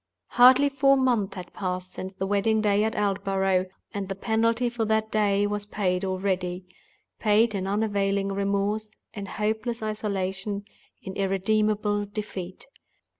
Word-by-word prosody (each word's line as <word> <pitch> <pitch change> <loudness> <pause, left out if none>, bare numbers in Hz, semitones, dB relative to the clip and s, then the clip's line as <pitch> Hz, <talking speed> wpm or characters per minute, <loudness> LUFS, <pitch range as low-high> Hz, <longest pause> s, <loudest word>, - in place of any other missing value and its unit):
Hardly 260 +3 +6
four 275 0 +4
months 235 -7 +1
had 180 -2 -8
passed 185 -1 -4
since 190 +1 -7
the 190 - -2
wedding 205 +2 +2
day 210 -1 +2
at 220 - -1
Aldborough, 195 -2 +1 0.3
and 200 -1 -4
the 195 - -3
penalty 230 +4 +1
for 240 -1 -2
that 220 0 0
day 205 -1 +2
was 205 0 -3
paid 185 -3 -1
already—paid 190 +3 -1
in 190 -1 -2
unavailing 200 -1 0
remorse, 200 +2 -1 0.2
in 200 -2 -6
hopeless 220 +3 -2
isolation, 200 -1 -3 0.4
in 190 - -6
irremediable 205 +1 +1
defeat! 200 -3 -6
205 Hz, 130 wpm, -26 LUFS, 195-220 Hz, 0.4 s, Hardly